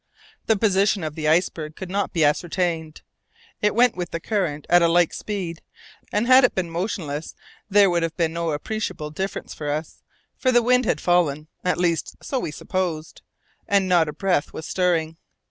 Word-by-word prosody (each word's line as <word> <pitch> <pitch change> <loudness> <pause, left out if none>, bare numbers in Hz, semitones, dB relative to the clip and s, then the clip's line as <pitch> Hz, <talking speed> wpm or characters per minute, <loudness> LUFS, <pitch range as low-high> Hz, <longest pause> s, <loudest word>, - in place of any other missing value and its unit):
The 220 - +3
position 200 -2 +2
of 155 -1 -3
the 155 0 -3
iceberg 160 -1 +1
could 185 -1 -7
not 200 +1 -1
be 165 -4 +2
ascertained. 160 0 -1 0.6
It 210 0 +2
went 245 0 +4
with 175 -1 -4
the 165 - -4
current 165 -7 -2
at 175 0 +5
a 170 - +5
like 170 0 +3
speed, 185 -6 -5 0.5
and 210 +3 +1
had 255 +2 +7
it 250 - +3
been 175 -3 -2
motionless 165 -5 -4 0.3
there 205 0 +6
would 175 -2 +1
have 165 -1 -3
been 165 -2 0
no 170 0 -2
appreciable 155 -1 -4
difference 190 +6 -4
for 150 -1 -5
us, 155 +2 -4 0.3
for 255 - +1
the 240 -1 +4
wind 250 +1 +3
had - - +1
fallen 160 -4 +1
at 180 - +1
least, 170 -2 0
so 265 - -3
we - - -3
supposed 170 -1 -4 0.5
and 200 -2 +2
not 170 -4 +3
a - - -5
breath 175 -3 0
was 160 - -7
stirring. 165 -3 0
175 Hz, 185 wpm, -23 LUFS, 160-200 Hz, 0.6 s, had